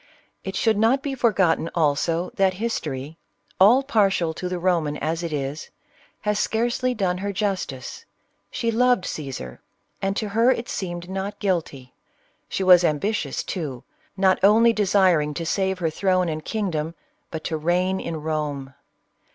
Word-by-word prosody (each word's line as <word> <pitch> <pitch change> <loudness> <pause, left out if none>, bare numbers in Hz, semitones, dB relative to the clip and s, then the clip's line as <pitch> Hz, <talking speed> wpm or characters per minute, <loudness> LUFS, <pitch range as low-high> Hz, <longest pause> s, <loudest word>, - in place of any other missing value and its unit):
It 190 0 -5
should 220 +1 +2
not 245 +6 +3
be 285 -3 -2
forgotten 190 -10 +2
also, 165 +2 +1
that 190 -1 +2
History 160 - -4 0.2
— 100 0 -36
all 240 +8 +7
partial 195 -10 +2
to 180 +3 -5
the 180 - -2
Roman 170 -5 0
as 165 +2 -2
it 170 -2 -4
is 145 +1 -4 0.3
— - - -32
has 210 0 0
scarcely 240 +2 0
done 185 -4 0
her 200 +1 -2
justice. 185 - -3 0.4
She 230 - -1
loved 245 -2 +3
Cajsar. 130 - -6 0.4
and 195 +1 -1
to 215 - -2
her 230 +4 +3
it 240 -2 0
seemed 175 -2 -4
not 195 +2 -4
guilty. 160 -10 -2 0.6
She 195 - -2
was 180 -1 +7
ambitious, 175 +7 -1
too, 145 -9 -5 0.3
not 190 -1 +3
only 225 +4 +6
desiring 185 -8 +2
to 165 - -3
save 190 +2 0
her 165 -3 -1
throne 185 0 +1
and 155 0 -4
kingdom, 170 -7 -2 0.3
but 160 -1 -6
to 160 - -2
reign 180 +4 +1
in 160 -2 -5
Rome. 145 -4 -3
185 Hz, 160 wpm, -23 LUFS, 155-205 Hz, 0.6 s, all